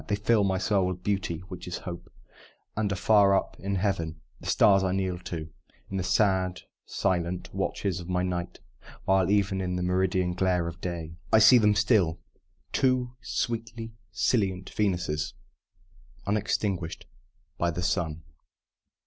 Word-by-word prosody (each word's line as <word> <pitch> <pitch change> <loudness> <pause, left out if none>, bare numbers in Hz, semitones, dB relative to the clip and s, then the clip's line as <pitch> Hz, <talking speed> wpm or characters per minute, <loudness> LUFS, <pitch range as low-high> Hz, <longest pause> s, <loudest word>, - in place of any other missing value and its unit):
They 105 - +1
fill, 105 +1 +2
my 95 -1 +1
soul 95 0 +2
with 90 -1 -4
Beauty 95 -5 -1
(which 90 -2 -8
is 90 - -3
Hope), 85 -1 -7 0.6
And 105 -2 0
are - - 0
far 100 0 +5
up - - -1
in 100 0 -2
Heaven 90 -5 -1 0.2
the - - -10
stars 95 -2 +5
I 95 -1 +1
kneel 95 -2 -1
to 80 -2 -5 0.4
In 95 - -2
the 95 - -1
sad, 95 0 +2 0.3
silent 90 -2 -1
watches 95 -3 -1
of 90 0 -8
my 90 0 +1
night; 90 -1 -3 0.4
While 95 -1 +3
even 100 -2 +2
in 90 -1 -2
the 90 - -1
meridian 90 0 +1
glare 90 -2 +1
of 85 0 -7
day 85 -2 -5
I - - +7
see 120 +3 +8
them 105 -1 +4
still 100 -6 +3 0.5
two 130 -2 +2
sweetly 115 -1 -3 0.2
scintillant 95 0 0
Venuses, 90 -7 -1 0.9
unextinguished 100 -4 -1 0.5
by 85 - +2
the 90 +1 -3
sun! 85 -4 -1
95 Hz, 150 wpm, -28 LUFS, 90-100 Hz, 0.9 s, see